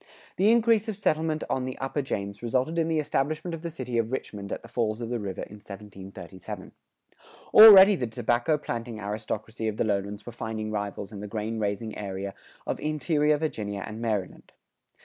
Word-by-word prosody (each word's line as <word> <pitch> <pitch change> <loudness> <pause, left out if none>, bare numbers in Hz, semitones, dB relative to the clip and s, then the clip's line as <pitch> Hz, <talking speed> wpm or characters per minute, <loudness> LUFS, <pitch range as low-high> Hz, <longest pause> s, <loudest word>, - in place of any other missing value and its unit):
[108:1] - - -27 0.3
The 205 +4 +5
increase 230 -2 +3
of 210 - -4
settlement 160 -5 0
on 130 -1 -1
the 130 - -5
upper 135 +2 -2
James 100 -6 -4
resulted 130 +7 0
in 165 - +1
the 165 -1 +1
establishment 155 +3 -1
of 165 - -5
the 170 - -4
city 125 -7 -3
of 115 +1 -1
Richmond 105 -6 -5
at - - -4
the - - -10
falls 115 -2 -1
of 120 0 -5
the 120 - -1
river 100 -3 -4
in 105 - -10
1737. 100 -2 -9 0.8
Already 205 -2 +11
the 125 -9 -2
tobacco 120 +6 +1
planting 115 -5 -5
aristocracy 110 +2 -4
of 110 -1 -2
the - - +2
lowlands 100 -1 -2
were 120 - -7
finding 110 -2 -4
rivals 100 -1 -4
in 105 - -8
the 105 - -6
grain 110 +1 -3
raising 105 +1 -2
area 100 -1 -5 0.3
of - - -2
interior 150 0 +1
Virginia 105 -10 -3
and 110 +1 -7
Maryland. 105 -5 -3
115 Hz, 190 wpm, -27 LUFS, 105-150 Hz, 0.8 s, Already